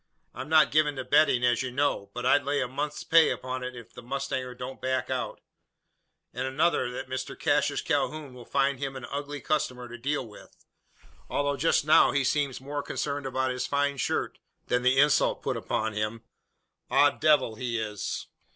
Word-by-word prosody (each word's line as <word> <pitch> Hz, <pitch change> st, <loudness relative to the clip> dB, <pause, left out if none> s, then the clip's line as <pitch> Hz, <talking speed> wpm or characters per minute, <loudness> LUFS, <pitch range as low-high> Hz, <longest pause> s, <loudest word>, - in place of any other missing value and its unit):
I'm 130 Hz, +3 st, -7 dB
not 160 Hz, -2 st, +5 dB
given 150 Hz, -1 st, +3 dB
to 130 Hz, -, -4 dB
betting, 130 Hz, -3 st, +3 dB
as 120 Hz, -1 st, +2 dB
you 130 Hz, -, -3 dB
know; 130 Hz, -6 st, 0 dB
but 125 Hz, 0 st, -4 dB
I'd 145 Hz, -, +4 dB
lay 145 Hz, +1 st, 0 dB
a 125 Hz, -, 0 dB
month's 145 Hz, +4 st, -4 dB
pay 165 Hz, -1 st, +5 dB
upon 130 Hz, 0 st, -4 dB
it 125 Hz, -3 st, -8 dB
the -, -, -10 dB
mustanger 130 Hz, 0 st, -4 dB
don't 130 Hz, +1 st, -7 dB
back 130 Hz, 0 st, -1 dB
out; -, -, -3 dB, 0.9 s
and 130 Hz, +2 st, -2 dB
another, 150 Hz, 0 st, +1 dB
that 125 Hz, -, -6 dB
Mr 130 Hz, 0 st, -5 dB
Cassius -, -, +1 dB
Calhoun 150 Hz, -4 st, -1 dB
will 125 Hz, -1 st, -11 dB
find 140 Hz, +1 st, 0 dB
him 135 Hz, -1 st, -4 dB
an 130 Hz, -2 st, -6 dB
ugly 145 Hz, +1 st, -4 dB
customer 135 Hz, -5 st, -1 dB
to 120 Hz, 0 st, -10 dB
deal 140 Hz, +1 st, -1 dB
with, 105 Hz, -, -16 dB, 0.6 s
although 145 Hz, 0 st, 0 dB
just 145 Hz, +1 st, +2 dB
now 155 Hz, -, +6 dB
he 140 Hz, -1 st, +2 dB
seems 140 Hz, 0 st, 0 dB
more 145 Hz, +2 st, -4 dB
concerned 145 Hz, -1 st, -3 dB
about 130 Hz, 0 st, -1 dB
his 125 Hz, 0 st, -3 dB
fine 140 Hz, 0 st, 0 dB
shirt, -, -, -2 dB, 0.3 s
than 125 Hz, -, +1 dB
the 130 Hz, +1 st, +3 dB
insult 145 Hz, +1 st, +3 dB
put -, -, -1 dB
upon 110 Hz, -, -2 dB
him. 105 Hz, +2 st, -3 dB, 0.7 s
Odd -, -, +4 dB
devil 145 Hz, -7 st, +4 dB
he 115 Hz, +1 st, -3 dB
is!" 105 Hz, -4 st, -4 dB
130 Hz, 185 wpm, -28 LUFS, 125-145 Hz, 0.9 s, now